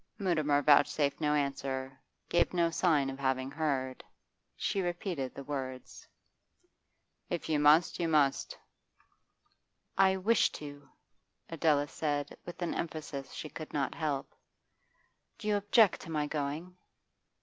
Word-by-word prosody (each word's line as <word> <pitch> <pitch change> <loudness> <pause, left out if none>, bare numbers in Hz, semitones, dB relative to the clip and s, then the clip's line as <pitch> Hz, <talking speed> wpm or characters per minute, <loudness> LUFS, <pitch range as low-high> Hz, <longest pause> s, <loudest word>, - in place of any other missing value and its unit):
Mutimer 155 -7 +1
vouchsafed 145 0 +4
no 150 -1 +2
answer, 135 -2 -2 0.3
gave 175 +1 +2
no 170 -1 +2
sign 155 -5 +2
of 135 - -9
having 130 0 0
heard. 135 -5 -2 0.5
She 195 - -1
repeated 175 -6 -3
the 140 - -7
words. 130 -2 -6 1.2
'If 175 -2 -3
you 155 -2 +1
must, 150 +3 +5
you 170 - +1
must.' 150 -4 +2 1.4
'I 190 0 +5
wish 210 +4 +3
to,' 145 -1 -9 0.6
Adela 150 -3 +2
said 145 -1 -2
with 175 0 -6
an 170 - -1
emphasis 150 -4 -5
she - - -6
could 155 +1 -9
not 140 -2 -1
help. 150 -4 -3 1.0
'Do 215 - -7
you 210 - +3
object 205 +1 +4
to - - -10
my 150 -2 0
going? 150 +4 -4
150 Hz, 125 wpm, -31 LUFS, 140-170 Hz, 1.4 s, must